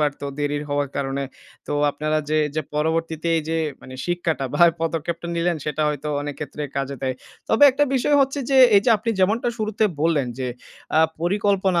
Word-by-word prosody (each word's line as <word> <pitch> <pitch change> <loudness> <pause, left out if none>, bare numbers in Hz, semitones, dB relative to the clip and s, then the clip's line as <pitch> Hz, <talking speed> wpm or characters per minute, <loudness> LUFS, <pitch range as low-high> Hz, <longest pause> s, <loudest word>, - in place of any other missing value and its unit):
পারত। 145 -1 0 0.2
দেরি 145 0 -1
হওয়ার 145 0 0
কারণে। 140 0 -2 0.4
তো - - -3 0.2
আপনারা 155 +2 -1
যে 155 - +2
এইযে 155 +2 -3
পরবর্তীতে 160 +1 -1
এইযে 160 +1 -2 0.3
মানে 130 - -10
শিক্ষাটা 175 -5 -1
বা 145 - -2
এ - - 0
পদক্ষেপটা 165 +1 -2
নিলেন 170 0 +1
সেটা 150 0 -1
হয়তো 145 0 -6 0.2
অনেক 145 -1 -5
ক্ষেত্রে 150 0 -5
কাজে 140 0 -2
দেয়। 130 -1 -1 0.3
তবে 225 - +2
একটা 290 +3 +2
বিষয় 270 +3 +2
হচ্ছে 275 +1 +1
যে, 270 - +3 0.2
এইযে 200 +4 +4
আপনি 230 +2 -2
যেমনটা 215 +6 +2
শুরুতে 215 0 0 0.2
বললেন 155 -4 +2
যে, 130 - -2 0.5
আ - - +6 0.2
পরিকল্পনা 190 0 +1
160 Hz, 180 wpm, -22 LUFS, 145-190 Hz, 0.5 s, আ